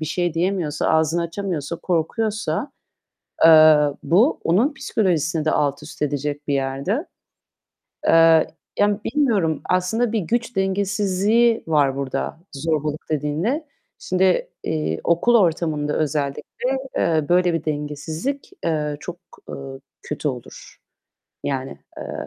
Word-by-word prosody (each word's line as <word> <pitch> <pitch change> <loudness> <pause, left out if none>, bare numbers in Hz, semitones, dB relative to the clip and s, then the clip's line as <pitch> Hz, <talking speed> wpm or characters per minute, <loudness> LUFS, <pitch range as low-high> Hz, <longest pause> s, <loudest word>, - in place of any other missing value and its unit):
bir - - -2
şey 175 +1 -1
diyemiyorsa, 170 -4 0
ağzını 160 +2 +2
açamıyorsa, 170 -3 -3
korkuyorsa, 210 - -1 0.7
eee, 155 -1 +8 0.3
bu 215 - +3
onun 230 - +2
psikolojisini 170 - 0
de 155 - +2
altüst 145 +1 -2
edecek 145 0 -2
bir 140 - +2
yerde. 140 - -1 1.0
Eee, 165 -1 +6 0.3
yani 205 0 +3
bilmiyorum 210 - +1
aslında 215 +6 +1
bir 225 - +1
güç 235 +6 -2
dengesizliği 200 +4 +1
var 145 -4 +2
burada 140 +3 -3
zorbalık 155 +1 -2
dediğinde. 160 - -1 0.3
Şimdi, 185 0 +1 0.2
eee, 80 +1 -2
okul 170 +8 +3
ortamında 160 -6 +1
özellikle, 155 - -2 0.2
eee, 160 -2 +2
böyle 175 -1 +3
bir 165 - -2
dengesizlik, 155 - -4
eee, 150 -3 -1
çok, 175 +3 -7 0.3
eee, - - -5 0.5
kötü 150 0 -3
olur. 125 -4 -8 0.7
Yani, 135 -1 -3 0.2
eee - - -6
165 Hz, 115 wpm, -22 LUFS, 150-200 Hz, 1.0 s, eee